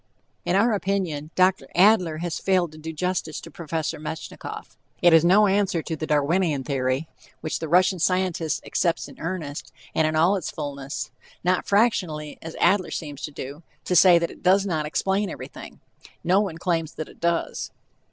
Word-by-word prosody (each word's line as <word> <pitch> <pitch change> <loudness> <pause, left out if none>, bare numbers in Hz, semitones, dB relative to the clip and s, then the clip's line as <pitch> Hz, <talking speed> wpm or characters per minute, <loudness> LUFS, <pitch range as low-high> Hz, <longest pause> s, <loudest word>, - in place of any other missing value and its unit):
In 180 - +1
our 225 +4 +4
opinion 190 -7 -2
Dr. 185 +1 +3
Adler 180 -4 +4
has 170 - -3
failed 185 -4 +1
to 155 - -13
do 160 +1 -6
justice 165 -1 -2
to - - -11
Prof. 165 -3 -10 0.3
Metchnikoff. 160 +1 -7 0.2
It 175 -1 +5
is 165 -1 +7
no 195 +5 +6
answer 195 -4 +1
to 160 - -3
the 155 0 -5
Darwinian 150 0 +1
Theory, 130 +2 -1 0.3
which 155 - -3
the 160 - -4
Russian 180 +3 +3
scientist 180 -2 0
accepts 170 -2 0
in - - -14
earnest, 160 -4 -5 0.2
and 160 - +2
in 155 - -1
all 170 +6 +4
its 180 - -4
fullness, 140 -2 -5 0.3
not 180 +1 +1
fractionally, 180 -9 +1
as 165 0 -8
Adler 185 +1 +3
seems 145 -3 -6
to 150 - -5
do 140 +2 -7 0.2
to 180 - 0
say 175 0 +8
that 170 0 -1
it - - -14
does 195 +2 +4
not 160 -5 -1
explain 195 +5 0
everything. - - -9 0.4
No 185 +4 +4
one 190 -6 -3
claims 165 -3 -1
that 155 - -5
it - - -16
does. 170 0 -1
170 Hz, 180 wpm, -24 LUFS, 155-185 Hz, 0.4 s, say